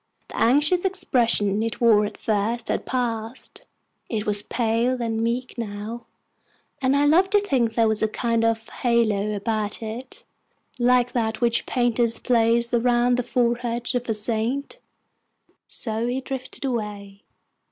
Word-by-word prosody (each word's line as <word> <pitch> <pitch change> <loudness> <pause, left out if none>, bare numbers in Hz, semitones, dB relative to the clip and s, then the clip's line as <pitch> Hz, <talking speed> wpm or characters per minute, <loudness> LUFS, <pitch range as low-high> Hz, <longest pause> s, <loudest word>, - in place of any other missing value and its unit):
The - - -9
anxious 295 +9 +3
expression 230 - +2
it 225 -1 -3
wore 215 -3 +4
at - - -10
first 225 +1 -1
had - - -2
passed. 235 -1 -4 0.4
It 215 -2 -2
was 205 -1 +4
pale 235 +3 0
and 225 -1 -2
meek 240 +2 -2
now, 220 +2 -6 0.7
and 265 +1 +2
I 285 +1 +3
love 350 +6 +4
to 415 +1 +4
think 250 - 0
there 230 -1 +3
was 220 -1 +1
a 220 - +3
kind 230 +1 -1
of 225 -1 0
halo 215 -4 0
about 215 +1 -2
it, 230 +4 -8 0.6
like 245 0 +3
that 220 -2 -1
which 235 -1 +2
painters 240 -2 +1
place 235 -1 +2
around 240 +1 +3
the 250 - 0
forehead 240 -1 -1
of 245 -1 -3
a 220 - +2
saint. 235 - -2 0.9
So 225 0 -3
he 250 +2 -1
drifted 265 +1 -6
away. 205 -5 -4
235 Hz, 145 wpm, -23 LUFS, 220-250 Hz, 0.9 s, wore